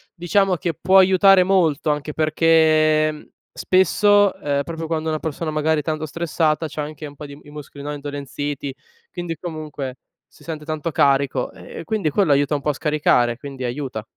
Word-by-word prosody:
diciamo, 185 +2 +1
che 170 0 -3
può 190 +5 +3
aiutare 190 0 +6
molto 165 -6 +2
anche 150 0 -3
perché, 155 -1 +3
mhmm, 150 - -13 0.3
spesso, 205 +2 +3
uhm, 140 -1 0
proprio 165 +2 -6
quando 160 -1 -2
una 155 - -1
persona, 160 +1 -4
magari, 155 0 +1
è - - -18
tanto 155 +1 -3
stressata, 160 0 -1
c'ha 150 0 -5
anche 150 +1 -7
un 145 -1 -10
pò 150 - -9
di 140 0 -11
i 145 - -15
muscoli, 145 -1 -10
no, 150 +1 -4
indolenziti 145 -1 -5 0.4
quindi, 175 -2 -5
comunque, 150 -6 -6 0.3
si - - -21
sente 155 -2 -6
tanto 155 0 -3
carico; 140 -2 +1
ehm, - - -14 0.2
e - - -8
quindi 195 -2 -1
quello 165 0 +1
aiuta 145 +1 +2
un 145 - -3
pò 150 - 0
a - - -6
scaricare, 140 -6 +1
quindi 135 -1 -8
aiuta. 125 -3 -4
155 Hz, 185 wpm, -21 LUFS, 145-165 Hz, 0.4 s, aiutare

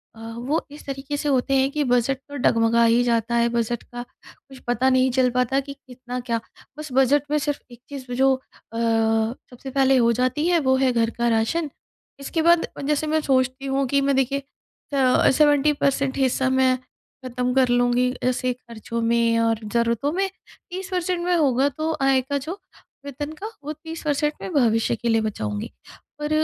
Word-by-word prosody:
अ, - - -15 0.2
वो 275 +7 -1
इस 295 - -12
तरीके 275 +1 -4
से 290 - -2
होते 270 0 +1
हैं 265 0 +2
कि 300 +1 0
बजट 250 +1 +1
तो 285 - -8
डगमगा 230 -2 +3
ही 230 +1 +4
जाता 235 -1 0
है। 235 0 +3
बजट 235 0 -2
का 240 0 -8 0.2
कुछ 270 -1 -16
पता 245 +2 +2
नहीं 260 0 +3
चल 255 0 +3
पाता 250 +2 +1
कि 280 0 -6
कितना 250 -2 -8
क्या 235 -2 -2 0.4
बस 305 0 -7
बजट 270 +2 +3
में 300 - +3
सिर्फ 290 -1 -2
एक 240 - -13
चीज़ 265 -3 -8
जो 265 +2 +3
अ, 260 - -12 0.4
सबसे 225 +3 -1
पहले 270 0 +3
हो 235 -1 +4
जाती 255 +6 0
है 350 -1 +3
वो 260 -3 +2
है 260 -1 +2
घर 230 -1 +2
का 240 0 +1
राशन। 235 +9 0 0.5
इसके 320 +4 -2
बाद 340 +1 +4 0.2
जैसे 300 +1 0
मैं 315 +1 +2
सोचती 260 -1 0
हूँ 270 0 0
कि 280 +2 +2
मैं 275 0 +1
देखिए 270 +1 +1 0.5
अ, 260 -2 +4
70 295 +1 +4
परसेंट 275 -1 0
हिस्सा 265 0 +1
मैं 260 -1 +3 0.5
खत्म 250 0 -2
कर 260 -1 +4
लूँगी 245 +1 +2
ऐसे 255 0 0
ख़र्चों 235 -1 -7
में 230 0 +2
और 225 -1 +1
ज़रूरतों 235 +4 +1
में 390 +2 0 0.4
30 375 +1 -6
परसेंट 360 -1 -1
में 355 0 +2
होगा 275 -4 +3
तो 310 +3 -3
आय 270 -1 +3
का 280 +3 -2
जो 300 +5 -5 0.5
वेतन 290 +2 -5
का 415 - -5 0.2
वो 300 +2 -4
30 320 +2 -9
परसेंट 295 0 +1
में - - -5
भविष्य 230 -5 +2
के 235 +1 -3
लिए 225 -1 +3
बचाऊँगी। 105 - -3 0.5
और 295 - -2
260 Hz, 190 wpm, -23 LUFS, 240-285 Hz, 0.5 s, ही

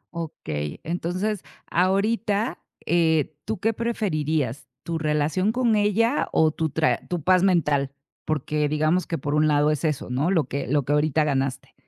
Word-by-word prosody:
Okey, 75 - -5
entonces 180 +4 -2 0.3
ahorita, 205 +4 +1 0.3
eh, 160 -3 +2
¿tú 220 +1 -2
qué 225 +1 +1
preferirías? 155 - -1 0.2
¿Tu 165 -1 -3
relación 155 +6 +1
con 240 -2 +2
ella 215 +5 +2
o 155 -1 +3
tu 160 +1 -2
tra 155 +2 +1
tu 175 -4 -3
paz 185 +2 +4
mental? 150 -7 +2 0.3
Porque, 150 0 -1
digamos 155 +4 +1
que 165 - -2
por 145 -1 -3
un 150 +1 +3
lado 150 0 +3
es 150 - -2
eso, 150 -5 -1
¿no?, 140 +7 +1
lo 175 -5 +3
que 140 - -3
lo 145 0 +1
que 145 - 0
ahorita 155 +1 +2
ganaste. 135 -2 -2
160 Hz, 160 wpm, -24 LUFS, 150-190 Hz, 0.3 s, paz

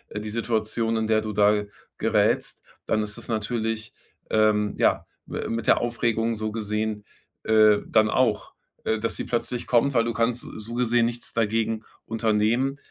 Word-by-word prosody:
die 105 0 -4
Situation, 115 0 -1
in 110 0 -1
der 110 0 +3
du 110 0 -4
da 105 +1 +3 0.3
gerätst, - - +1 0.2
dann 110 - +1
ist 105 -1 -3
das - - -7
natürlich, 110 0 -2 0.4
ähm, 105 -1 +2
ja, - - +2 0.2
m - - -3
mit 115 -1 -4
der - - +5
Aufregung 115 -1 0
so 110 0 -3
gesehen, 105 -1 -3 0.4
äh, 110 -1 +5
dann 110 -1 +3
auch, 115 -4 +1 0.3
äh, 110 - 0
dass 115 +1 -2
sie - - -4
plötzlich 120 0 -3
kommt, 125 +3 +3
weil 115 -2 +3
du 115 0 -2
kannst 115 +1 0 0.2
so 110 +2 -7
gesehen 120 -1 +2
nichts 120 0 -5
dagegen 110 0 0 0.2
unternehmen, 115 +4 +1
110 Hz, 165 wpm, -25 LUFS, 110-115 Hz, 0.4 s, der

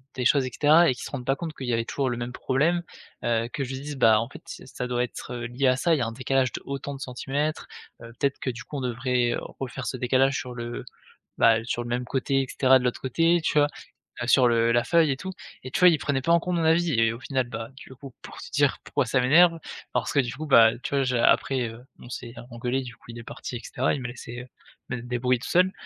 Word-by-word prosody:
des 125 -2 -2
choses 135 +1 +4
et 130 - -5
cetera 155 +5 +5
et - - +2
qu'ils - - -9
se - - -6
rendent 130 -4 -5
pas 135 +2 +2
compte 160 +1 -6
qu'il 130 - -6
y 120 - 0
avait 115 0 0
toujours 140 -2 -2
le 120 - -3
même 120 +1 -5
problème, 155 +8 +1 0.4
heu, 115 0 +1
que 145 - -2
je 130 - -5
lui 130 - -5
dise: 145 -1 -6
«Bah, 110 -4 +5
en 115 - -5
fait - - -12
c'est - - -10
ça 125 - -5
doit 125 0 0
être, 125 - -7
heu, 120 -1 -5
lié 125 +3 -2
à 130 - +4
ça, 165 +4 +2
il 150 - -1
y - - -1
a - - +1
un 115 - -4
décalage 130 +1 0
d'autant 140 +1 -5
de 135 - -10
centimètres. 140 +4 -3 0.4
Heu, 115 0 -10
peut-être 140 -1 0
que, 130 - -2
du 120 -2 -9
coup, 145 - -7
on - - -3
devrait 125 -1 0 0.3
refaire 130 0 -5
ce 130 - -3
décalage 130 +2 +2
sur 130 -5 -6
l-e 120 0 -5 0.5
bah, 115 0 +4
sur 120 0 -2
le 120 - -7
même 125 +1 -1
côté 135 +1 0
et - - -4
cetera, 130 -1 +4
de 125 - -5
l'autre 125 - -1
côté, 165 +6 +2
tu - - 0
vois? 145 - +5 0.6
Heu, - - -4
sur, 130 -1 +5
heu, 115 0 +3
la 120 - +3
feuille 160 +2 +3
et - - 0
tout», 190 +7 -6 0.3
et 130 - -8
tu - - -1
vois? 180 -1 +8
Il 160 - +3
prenait 140 -3 -1
pas 170 - +1
en 170 - +5
compte 180 0 -2
mon 165 - 0
avis. 165 +1 +3
Et 115 -1 +3
au 115 - -9
final, 130 -3 -1
bah, 115 0 -6
du 130 - -13
coup, 135 0 -11
pour - - -11
te - - -10
dire 145 -1 +2
pourquoi 140 -2 -1
ça 125 +3 +1
m'énerve, 165 +6 +5 0.3
parce - - -1
que, 145 - +3
du 120 -3 0
coup, 155 +2 -6
bah, 115 -5 +7
tu 140 - -2
vois? 140 - +2
J'ai 125 -2 0
après, 130 0 +2
heu, 115 +2 -12 0.2
on 120 - -12
s'est, 120 -2 -7
heu, - - -7
engueulé, 125 +3 -2
du 125 -1 -9
coup, - - -25
il 120 - -9
est 115 - -9
parti 120 - -7
et 120 - -11
cetera. 130 - -1
Il 140 - -3
m'a 125 - -4
laissé, 120 0 -8
heu, 125 - -11 0.4
me 125 -1 -3
débrouiller 125 +1 0
tout 130 - -7
seul 185 +2 +4
130 Hz, 285 wpm, -25 LUFS, 120-140 Hz, 0.6 s, vois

